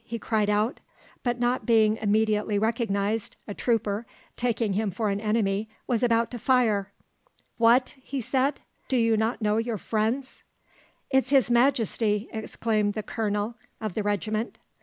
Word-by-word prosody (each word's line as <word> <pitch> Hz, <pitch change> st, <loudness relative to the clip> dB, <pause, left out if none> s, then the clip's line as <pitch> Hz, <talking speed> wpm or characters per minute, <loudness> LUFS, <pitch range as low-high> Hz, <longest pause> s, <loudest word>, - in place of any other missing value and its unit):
he 230 Hz, 0 st, -5 dB
cried 215 Hz, -2 st, 0 dB
out; 210 Hz, +5 st, +1 dB, 0.4 s
but 245 Hz, -1 st, -1 dB
not 245 Hz, +1 st, +1 dB
being 220 Hz, -2 st, +4 dB
immediately 215 Hz, -1 st, +1 dB
recognised, 220 Hz, -1 st, 0 dB
a 205 Hz, -, -4 dB
trooper, 220 Hz, -2 st, 0 dB, 0.3 s
taking 230 Hz, -4 st, 0 dB
him 210 Hz, +1 st, 0 dB
for 210 Hz, +2 st, -1 dB
an 200 Hz, +1 st, -2 dB
enemy, 210 Hz, -1 st, 0 dB, 0.2 s
was 235 Hz, -3 st, 0 dB
about 230 Hz, -1 st, +2 dB
to 245 Hz, -, -5 dB
fire. 220 Hz, -5 st, +2 dB, 0.7 s
"`What!' 235 Hz, +3 st, +4 dB, 0.3 s
said 270 Hz, +4 st, 0 dB, 0.3 s
he, 265 Hz, -, +1 dB
`do -, -, +3 dB
you 230 Hz, -1 st, +3 dB
not 220 Hz, +1 st, -1 dB
know 210 Hz, 0 st, +2 dB
your 225 Hz, -1 st, -1 dB
friends?' 225 Hz, +7 st, -2 dB, 0.7 s
"`It's 265 Hz, -1 st, +3 dB
his 270 Hz, -3 st, +4 dB
Majesty!' 235 Hz, -4 st, +2 dB
exclaimed 215 Hz, -2 st, -1 dB
the 215 Hz, -, -3 dB
colonel 210 Hz, +1 st, -2 dB, 0.3 s
of 215 Hz, -4 st, -4 dB
the 215 Hz, -, -1 dB
regiment. 210 Hz, +2 st, -2 dB
220 Hz, 150 wpm, -26 LUFS, 210-235 Hz, 0.7 s, being